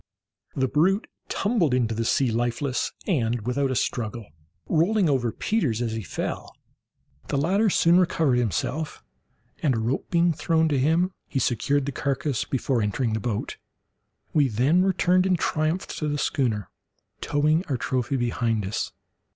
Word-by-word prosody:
The 130 -1 +1
brute 185 - +2 0.2
tumbled 195 - +1
into 115 -3 +1
the 115 +1 -2
sea 130 +1 +2
lifeless, 120 +3 -1
and 120 - 0
without 135 +2 0
a 130 - -1
struggle, 115 -2 -2 0.4
rolling 180 +4 +2
over 130 -5 +1
Peters 145 - 0
as 120 -2 -1
he 110 0 -3
fell. 95 - -5 0.7
The 140 - -1
latter 195 +9 +2
soon 170 -1 +4
recovered 160 -8 +2
himself, 130 +7 -2 0.6
and 135 -5 +2
a - - -1
rope 115 +5 -2
being 170 0 +3
thrown 160 +1 +1
him, 160 +7 +2 0.2
he - - -4
secured 135 +3 +1
the 140 - -2
carcass 140 -1 -1
before 130 -2 0
entering 110 +3 0
the 110 - 0
boat. 105 0 -3 0.8
We 145 -3 +4
then 130 - +2
returned 185 0 +3
in 185 - +3
triumph 160 +2 0
to 155 - -1
the 145 0 -1
schooner, 115 - -1 0.5
towing 155 +3 +2
our 135 - -1
trophy 130 +2 -1
behind 115 -3 0
us. 100 - -3
135 Hz, 150 wpm, -25 LUFS, 120-165 Hz, 0.8 s, soon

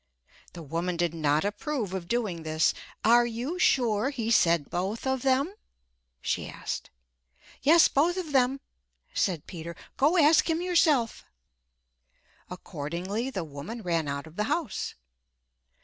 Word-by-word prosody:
The 170 - -8
woman 170 +4 -2
did 170 -1 0
not 155 0 +1
approve 210 - -3
of 185 -3 -4
doing 210 -8 -1
this. 155 0 +1 0.3
"Are 240 +2 +6
you 245 +10 -4
sure 240 - +3
he 230 -5 -3
said 170 -8 +3
both 190 +7 -2
of 265 -1 0
them?" 275 +7 +2 0.7
she - - -2
asked. - - -5 0.7
"Yes, 325 +4 +6
both 335 +6 +2
of 345 -5 -4
them," 265 0 +2 0.5
said 170 -6 0
Peter. 170 -1 -7 0.2
"Go 300 +7 +3
ask 315 +1 +5
him 325 0 +1
yourself." 315 -9 +2 1.3
Accordingly, 180 - -4
the 190 -9 -3
woman 160 +10 -7
ran 165 -4 0
out 140 +1 -3
of 160 +1 -15
the 210 - +1
house. 300 - -2
215 Hz, 135 wpm, -28 LUFS, 170-270 Hz, 1.3 s, Are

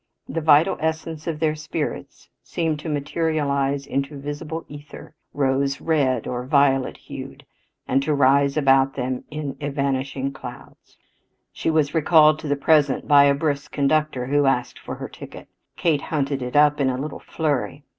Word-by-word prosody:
The 165 - -3
vital 150 0 +4
essence 160 0 -3
of 160 -2 -3
their 155 -1 +1
spirits 155 0 -5
seemed 160 -3 -2
to 160 - -6
materialize 145 -2 -1
into 140 +2 -3
visible 150 +3 -6
ether, 145 +1 -11 0.2
rose 140 0 0
red 145 -6 +1
or 125 0 -3
violet 135 -2 +2
hued, - - -10 0.4
and 135 +1 +2
to 150 +2 0
rise 140 +1 +3
about 135 -2 +3
them 125 -1 -3
in 150 -2 -5
evanishing 140 -1 -2
clouds. 135 - -12 0.6
She - - -2
was 155 -2 +1
recalled 155 -1 +5
to - - -7
the 145 - +1
present 145 -1 +2
by 140 -1 +7
a 140 0 +4
brisk 145 -1 -2
conductor 145 -2 +1
who 145 +1 +2
asked 125 -2 0
for - - -7
her - - -6
ticket. - - -11 0.3
Kate 155 -5 +1
hunted 140 -3 -2
it 125 +1 -5
up 150 0 +4
in 135 - +2
a 125 - -2
little 150 +4 -5
flurry. 145 -2 -2
145 Hz, 160 wpm, -22 LUFS, 135-155 Hz, 0.6 s, by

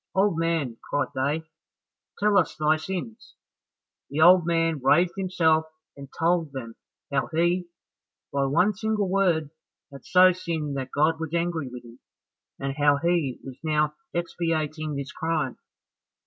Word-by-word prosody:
"Old 195 -1 +3
man," 165 -8 -1
cried 145 -3 0
they, 145 +5 -1 0.7
"tell 210 0 +2
us 180 -6 +2
thy 155 0 +2
sins." 155 - -6 0.7
The 145 - -3
old 175 +1 +7
man 165 -3 +1
raised 170 +7 +4
himself 165 -5 +2 0.3
and 140 -1 -10
told 165 -3 +1
them 115 -4 -6 0.4
how 135 - 0
he, 175 +2 +1 0.7
by 140 -1 +1
one 165 +10 +2
single 210 0 -1
word, 175 -6 +1 0.4
had 140 -2 -11
so 185 0 +6
sinned 165 -5 -3
that 130 -1 -4
God 155 +2 +2
was 160 0 -4
angry 170 -5 -1
with 125 -1 -10
him, 120 +2 -14 0.6
and 135 +1 -4
how 145 -1 +4
he 165 -4 0
was 130 -2 -9
now 150 -1 +1 0.2
expiating 155 -3 -2
this 140 -1 -5
crime. 160 -5 -2
160 Hz, 145 wpm, -25 LUFS, 140-175 Hz, 0.7 s, old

